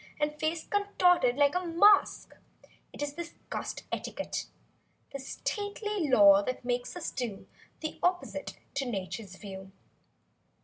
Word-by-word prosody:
And 300 0 +1
face 315 +2 -2
contorted 360 -10 +3
like 285 0 +4
a 360 0 0
mask. 370 +4 +4 0.6
It - - -5
is 290 -1 -3
this 340 +2 -7 0.2
cussed - - -4
etiquette; - - -4 0.7
This 270 -1 -6
stately 410 -4 -2
law 200 -5 +8
that 250 +3 -4
makes 245 +2 -2
us 355 - -4
do 235 -7 -4 0.4
The 315 - -5
opposite 360 0 -1 0.2
to 275 -2 0
Nature's 195 -1 -5
view. 190 -1 -9
290 Hz, 130 wpm, -30 LUFS, 245-355 Hz, 0.7 s, law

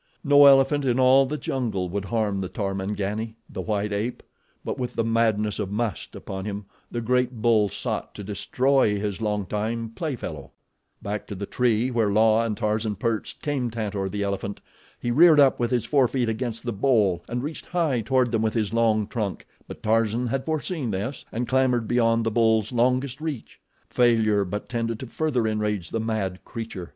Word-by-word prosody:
No 145 -1 +7
elephant 140 +1 +5
in 130 -1 +1
all 130 +1 +6
the 150 +3 -3
jungle 120 -9 -2
would 100 +2 -3
harm 105 -3 -1
the 95 - -4
Tarmangani—the 105 +3 -4
white 105 -1 -1
ape; 110 +5 -3 0.4
but - - -3
with 125 -1 -3
the 115 - +1
madness 110 -2 +1
of 100 -3 -2
must 105 -2 -3
upon 95 -1 -6
him 100 -1 -5 0.2
the 120 - -3
great 125 0 0
bull 110 -2 +3
sought - - -4
to 105 - -7
destroy 105 +2 +1
his 105 0 -3
long 105 -2 -1
time 110 +4 -2
play 150 +3 -3
fellow. 75 - -7 0.5
Back 105 0 -4
to 105 - -6
the 100 +2 -4
tree 120 +2 +1
where 115 -4 +1
La 110 +2 +4
and 110 -2 -2
Tarzan 110 -1 -1
perched 115 +1 -3
came 140 -5 -1
Tantor, 105 -4 -3
the 100 +1 -2
elephant. 100 0 -3 0.4
He 120 - -2
reared 155 +3 +7
up 140 -2 +5
with 120 -1 +1
his 120 -2 0
forefeet 130 -3 +2
against 115 0 -3
the 120 - -2
bole 105 -5 +2
and 120 +1 -2
reached 155 +2 -6
high 160 -9 0
toward 125 +1 +1
them 115 -2 +1
with 110 0 0
his 110 -2 0
long 110 -2 +2
trunk; 105 -3 -4 0.2
but - - -10
Tarzan 115 +2 +1
had 130 +3 -2
foreseen 155 -3 -2
this 105 +7 -4
and 120 +2 -2
clambered 130 -3 +2
beyond 115 -1 +2
the 115 - 0
bull's 110 -1 +2
longest 130 +3 +1
reach. 155 -7 -5 0.3
Failure 110 -4 +3
but 105 +3 -5
tended 115 -2 -2
to - - -4
further 130 -2 -1
enrage 105 -4 -2
the 115 - -1
mad 110 -4 -2
creature. 110 -7 -7
115 Hz, 185 wpm, -25 LUFS, 105-125 Hz, 0.5 s, No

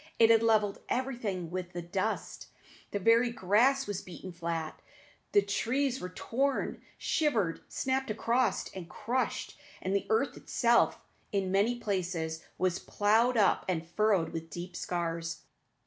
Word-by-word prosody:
It 225 0 +7
had 225 -1 +6
levelled 215 -3 +2
everything 225 -10 -2
with 180 0 -4
the 175 - -3
dust; 190 +5 -3 0.4
the - - -2
very 230 +4 +4
grass 240 +6 +3
was 205 -2 -3
beaten 185 +1 -9
flat; 165 -2 -4 0.5
the 205 - +5
trees 255 +6 0
were 180 - -4
torn, 265 +9 -1 0.2
shivered, 225 - +1
snapped 265 0 -1
across, 235 +4 +1
and 180 -3 -7
crushed; 245 +4 -2 0.2
and 190 +1 -1
the 200 - 0
earth 225 +5 +2
itself 235 -1 +3 0.3
in 195 -2 0
many 205 +5 +3
places 175 -7 -2
was 185 -1 +1
ploughed 225 +4 +2
up 205 -3 +4
and 170 -3 -1
furrowed 195 -1 +2
with 165 0 -5
deep 175 +1 -7
scars. 165 -1 -3
205 Hz, 140 wpm, -31 LUFS, 180-235 Hz, 0.5 s, It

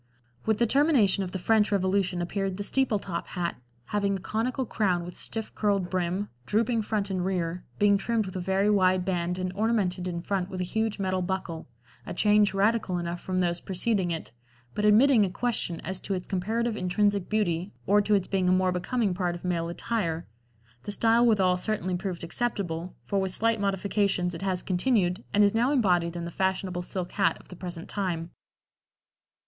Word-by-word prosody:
With 220 -1 +3
the 235 - +3
termination 240 - +3
of 180 - -5
the 190 - -3
French 215 +3 +2
Revolution 190 -2 +1
appeared 195 +1 -2
the 205 - -3
"steeple 260 0 +1
top" 180 -3 -5
hat, 175 -1 -3 0.3
having 200 -1 0
a - - -9
conical 235 +7 -2
crown 185 -6 0
with 180 - -8
stiff 220 -1 -3
curled 200 -4 0
brim, 185 +2 -1 0.2
drooping 225 +2 +1
front 205 -2 -1
and 185 -2 -1
rear, 180 -2 -2
being 205 -1 +4
trimmed 225 +1 0
with 185 - -8
a - - -2
very 190 +2 +1
wide 185 -3 +3
band 180 -1 -1
and 185 0 -3
ornamented 200 -4 0
in 170 -1 -4
front 190 -1 -1
with 185 - -5
a - - 0
huge 220 +3 -1
metal 185 -2 -1
buckle, 180 -3 -3 0.4
a - - -6
change 210 +1 +4
radical 200 -1 +1
enough 175 0 -4
from 185 -1 -1
those 175 -1 0
preceding 190 0 0
it, 165 -1 -4 0.4
but 210 - -1
admitting 225 +2 +6
a 195 - +1
question 195 -5 -2
as 190 +2 -4
to 195 - -3
its 180 - -5
comparative 220 +5 -1
intrinsic 200 0 +1
beauty 190 -3 0
or 205 +1 +4
to 210 +1 +2
its 195 -2 0
being 185 -2 +1
a - - +4
more 185 0 +3
becoming 195 +3 0
part 180 -1 -1
of 175 - -9
male 170 -2 -1
attire; 170 -3 -2 0.6
the 205 - -5
style 230 +3 +3
withal 190 -5 +3
certainly 185 -2 -1
proved 180 -1 -4
acceptable, 175 -3 -2
for 200 - -1
with 190 -1 -2
slight 230 -1 +1
modifications 195 -2 0
it 165 - -7
has 190 -2 -1
continued 185 0 +1
and 205 - +4
is 200 - +4
now 240 +4 +2
embodied 180 - +2
in 170 0 -4
the 170 - -5
fashionable 190 -1 -1
silk 180 0 -5
hat 200 - +2
of - - -19
the 180 - -9
present 175 -1 -7
time. 175 -4 -3
190 Hz, 195 wpm, -27 LUFS, 180-210 Hz, 0.6 s, admitting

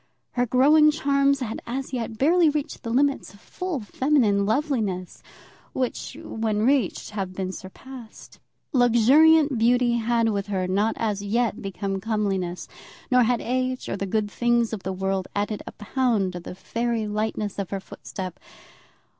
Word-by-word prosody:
Her 245 0 0
growing 295 +6 +5
charms 280 -2 +2
had 225 -3 -4
as 265 +3 -4
yet 230 -3 -4
hardly 330 +3 +4
reached 295 -1 -3
the 230 - -5
limits 270 -2 +1
of - - -18
full 365 - -4
feminine 215 -4 +2
loveliness, 220 - -1 0.5
which, 255 +1 -3
when 220 -8 -1
reached, 270 -4 +1
have 195 -3 -4
been 185 -1 -3
surpassed. 225 +5 -11 0.3
Luxuriant 270 +4 +5
beauty 240 +1 +3
had 230 0 +1
with 200 -1 -2
her 190 -3 -1
not 205 +4 +1
as 210 -3 -1
yet 225 +1 0
become 195 0 -4
comeliness; 195 -5 -2 0.4
nor 250 0 +5
had 240 0 +2
age 255 +1 -2
or - - -1
the 195 0 -3
good 210 +1 -1
things 240 -1 +1
of 210 - -4
the 190 - -3
world 190 0 -2
added 205 +1 -2
a - - -5
pound 215 -4 0
to 175 - -5
the 175 - -9
fairy 230 +2 -2
lightness 210 -1 -2
of 195 - -3
her 195 - -3
footstep. 190 -1 -8
225 Hz, 155 wpm, -24 LUFS, 200-255 Hz, 0.5 s, growing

